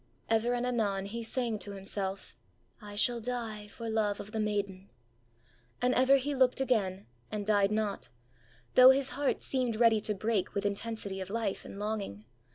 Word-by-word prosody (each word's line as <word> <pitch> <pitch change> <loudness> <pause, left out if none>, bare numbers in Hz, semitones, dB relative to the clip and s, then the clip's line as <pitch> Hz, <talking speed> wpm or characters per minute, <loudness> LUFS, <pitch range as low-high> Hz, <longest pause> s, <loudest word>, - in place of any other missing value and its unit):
Ever 225 +2 +2
and 245 0 -1
anon 205 -6 0
he 230 +4 -5
sang 230 -1 -1
to 205 - -6
himself: 195 0 -4 0.5
ãI 205 -1 -9
shall 240 +2 +3
die 225 -3 -4
for 230 +2 -8
love 215 -2 0
of 205 - -8
the 220 - -3
maiden;ã 200 -3 -2 0.9
and 250 +1 +2
ever 260 +2 +5
he 280 +2 -2
looked 260 -1 +3
again, 205 -8 0 0.3
and 210 -1 -3
died 205 -2 +3
not, 215 -2 -2 0.6
though 255 0 +9
his 270 0 +3
heart 285 -1 -1
seemed 255 -4 0
ready 225 -1 +4
to 210 0 -1
break 210 -1 -1
with 200 - -1
intensity 200 -1 -2
of 190 - -6
life 220 -2 -2
and - - -9
longing. 205 - -4
215 Hz, 170 wpm, -31 LUFS, 200-240 Hz, 0.9 s, though